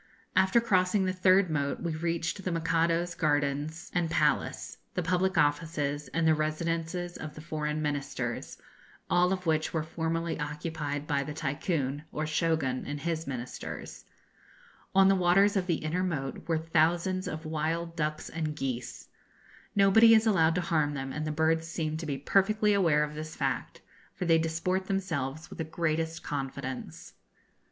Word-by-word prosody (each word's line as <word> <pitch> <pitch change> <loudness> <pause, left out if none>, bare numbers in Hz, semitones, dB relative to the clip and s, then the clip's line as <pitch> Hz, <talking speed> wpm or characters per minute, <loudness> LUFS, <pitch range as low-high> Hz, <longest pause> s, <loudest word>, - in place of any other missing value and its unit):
After 190 +5 +5
crossing 190 -3 +2
the 185 - 0
third 185 -1 +4
moat 140 -2 -1
we 170 -2 -2
reached 165 +3 -2
the 180 - -1
Mikado's 165 +1 +1
gardens 150 +1 -1
and 175 -2 +1
palace, - - 0 0.2
the 180 - 0
public 180 +1 +1
offices, 145 -1 +1
and 165 -1 0
the 160 - +6
residences 165 +3 -2
of 155 -1 -7
the - - -9
foreign 155 -1 -2
Ministers, 145 -2 -3 0.5
all 180 +1 +4
of 185 -1 -2
which 155 -1 +1
were 160 - +1
formerly 165 +1 -2
occupied 150 -1 -3
by 145 -2 0
the 150 +1 -6
Tycoon, 145 -1 -2
or 155 - -2
Shogun, 155 -4 0
and 145 0 -4
his 165 -2 -2
ministers. 125 -2 -6 0.9
On 195 0 +7
the 195 - +6
waters 195 +2 +4
of 190 -2 0
the 170 - +2
inner 170 +4 0
moat 145 -7 -3
were 165 -1 +2
thousands 170 +4 +1
of 155 +1 -5
wild 160 +2 -2
ducks 155 -1 -2
and 155 -2 -3
geese. 130 -4 -4 0.7
Nobody 225 +3 +7
is 220 +1 +4
allowed 165 -7 +4
to 180 - +1
harm 155 -4 +1
them, 135 -1 -4
and 150 +1 -3
the - - -1
birds 160 +1 +1
seem 160 -2 -2
to 160 0 -5
be 140 -2 -2
perfectly 210 +8 +2
aware 165 -7 +3
of 150 0 -4
this 155 +1 -6
fact, - - -2 0.3
for 180 - -3
they 165 -1 +5
disport 165 +4 -1
themselves 160 -7 -2
with - - -10
the - - 0
greatest 160 0 -2
confidence. 135 -2 -5
160 Hz, 160 wpm, -29 LUFS, 150-175 Hz, 0.9 s, On